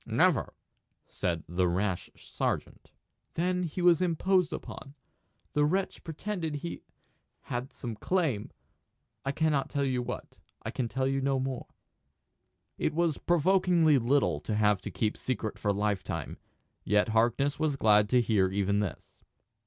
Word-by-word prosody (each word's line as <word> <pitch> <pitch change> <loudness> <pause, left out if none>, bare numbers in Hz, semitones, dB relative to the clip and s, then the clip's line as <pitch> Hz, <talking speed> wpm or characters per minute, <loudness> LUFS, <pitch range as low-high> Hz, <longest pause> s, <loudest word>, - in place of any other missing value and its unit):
"Never," - - +2 0.5
said 85 -2 -2
the 90 +2 +1
rash 90 +1 -1
sergeant. - - -4 0.5
"Then 180 +2 +1
he 175 +1 -3
was 175 -1 +5
imposed 180 +1 +2
upon. 135 +1 -7 0.6
The 150 - +3
wretch 185 +6 0
pretended 165 -1 -4
he 160 +4 -5 0.6
had 125 +2 -4
some 120 -4 -6
claim 150 - 0 0.7
I 135 - 0
cannot 150 -2 +1
tell 140 -1 -1
you 130 -2 0
what. 120 - -6 0.3
I - - -3
can 125 - -2
tell 130 +3 -1
you 135 0 0
no 135 0 +1
more." 130 -1 -3 1.1
It - - 0
was 170 -2 +1
provokingly 175 -3 +4
little 120 - +2
to 105 +8 -3
have 105 -2 +3
to - - -5
keep 110 -1 -1
secret 115 -4 -3
for 105 - +1
lifetime; 100 -1 -2 0.4
yet 105 +1 +2
Harkness 120 +6 +2
was 155 -3 +1
glad 105 -4 +4
to 125 +1 +4
hear 105 -5 +2
even 100 +1 +1
this. 105 -3 -5
135 Hz, 145 wpm, -29 LUFS, 105-160 Hz, 1.1 s, was